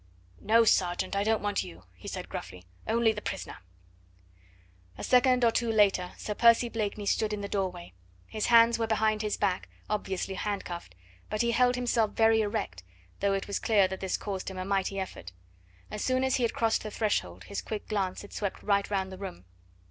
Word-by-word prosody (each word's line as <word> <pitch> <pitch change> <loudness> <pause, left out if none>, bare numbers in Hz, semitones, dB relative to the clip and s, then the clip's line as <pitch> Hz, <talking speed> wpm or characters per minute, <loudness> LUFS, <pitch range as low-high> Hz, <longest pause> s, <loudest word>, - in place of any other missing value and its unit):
"No, 230 +2 +4
sergeant, 180 -3 +2
I 200 - +1
don't 220 0 +1
want 205 -1 0
you," 85 +2 -11
he 90 - -13
said - - -5
gruffly; 90 0 -8 0.2
"only 230 0 +3
the 210 -1 -5
prisoner." 195 - -5 1.4
A - - -7
second 250 -1 +4
or 230 - +5
two 235 0 0
later 195 -4 +3
Sir 210 - -4
Percy 235 +2 +5
Blakeney 210 -2 -3
stood 210 +1 +1
in 210 - -3
the 200 - -3
doorway; 185 - -3 0.3
his 215 - -3
hands 230 0 +6
were 225 - 0
behind 215 -1 +1
his 210 -1 -1
back, 190 -3 -1 0.2
obviously 195 -2 -2
hand 200 +1 -3
cuffed, 170 - -7 0.3
but 215 +2 0
he 235 - +2
held 250 +1 +3
himself 235 -3 +1
very 225 0 +4
erect, 205 - -3 0.4
though 200 0 +2
it 195 - -1
was 200 - -2
clear 205 -4 +3
that 190 - -5
this 190 -1 -1
caused 195 -2 -4
him 190 - -8
a 185 - -3
mighty 195 0 0
effort. 90 - -7 0.6
As 210 - -4
soon 255 0 +1
as 265 -1 +2
he - - -3
had 235 - 0
crossed 225 -1 +1
the 215 - -5
threshold 95 - -1
his 200 - -5
quick 215 -1 -6
glance 195 -3 -2
had 205 - -12
swept 200 -2 -4
right 200 -1 +1
round 190 -2 -1
the 190 - -9
room. 95 - -7
210 Hz, 200 wpm, -29 LUFS, 190-225 Hz, 1.4 s, hands